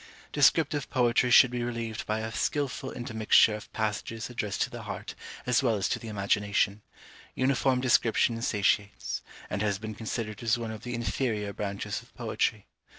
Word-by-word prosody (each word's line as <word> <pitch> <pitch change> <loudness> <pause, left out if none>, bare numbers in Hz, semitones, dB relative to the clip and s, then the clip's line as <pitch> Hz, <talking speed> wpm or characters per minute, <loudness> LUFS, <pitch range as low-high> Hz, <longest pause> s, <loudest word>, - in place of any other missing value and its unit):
Descriptive 145 0 +3
poetry 125 -1 +3
should 125 0 +7
be 125 -1 -2
relieved 115 -2 -4
by 110 +1 -1
a 110 0 -4
skilful 135 +2 -2
intermixture 110 -3 +3
of 105 - -8
passages 110 +2 -3
addressed 105 -5 -1
to - - -4
the - - -7
heart - - -6 0.3
as 125 +1 +3
well 120 -4 +2
as 100 - 0
to - - -1
the 115 - -9
imagination: 100 0 +1 0.5
uniform 130 0 +2
description 115 -2 +3
satiates; 105 -2 0 0.3
and 100 - -3
has 100 -2 +1
been 110 +1 -6
considered 110 -1 -4
as 115 -1 +2
one 115 -2 -4
of 110 -1 -7
the 125 0 -4
inferior 115 -3 -1
branches 100 0 -3
of - - -22
poetry. - - -1
115 Hz, 165 wpm, -28 LUFS, 105-125 Hz, 0.5 s, should